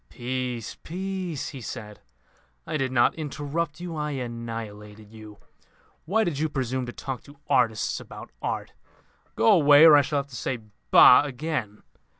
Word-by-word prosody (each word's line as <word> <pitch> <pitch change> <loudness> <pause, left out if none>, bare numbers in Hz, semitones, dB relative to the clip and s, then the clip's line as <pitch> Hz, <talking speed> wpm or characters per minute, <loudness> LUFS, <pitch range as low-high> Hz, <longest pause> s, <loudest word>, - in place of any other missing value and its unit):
"Peace, 125 -2 -4
peace," 185 -3 -4
he 135 - -9
said. 105 -2 -8 0.7
"I - - -4
did 135 -3 -1
not 120 -2 +3
interrupt 155 +1 -4
you. 175 -2 -6
I 150 -1 -2
annihilated 115 -4 -7
you. 110 -2 -12 0.7
Why 215 +7 +2
did 170 -8 -2
you 155 0 0
presume 130 -2 -2
to - - -5
talk 130 0 -6
to 145 0 -15
artists 110 -4 +1
about - - -11
art? - - -4 0.6
Go 225 - +4
away, 150 -4 +7
or 155 -2 +9
I 145 - +7
shall 145 +1 -2
have 140 0 -2
to 130 - -11
say 130 - -3 0.3
Bah! - - +8
again. 135 -6 -4
135 Hz, 160 wpm, -25 LUFS, 115-155 Hz, 0.7 s, or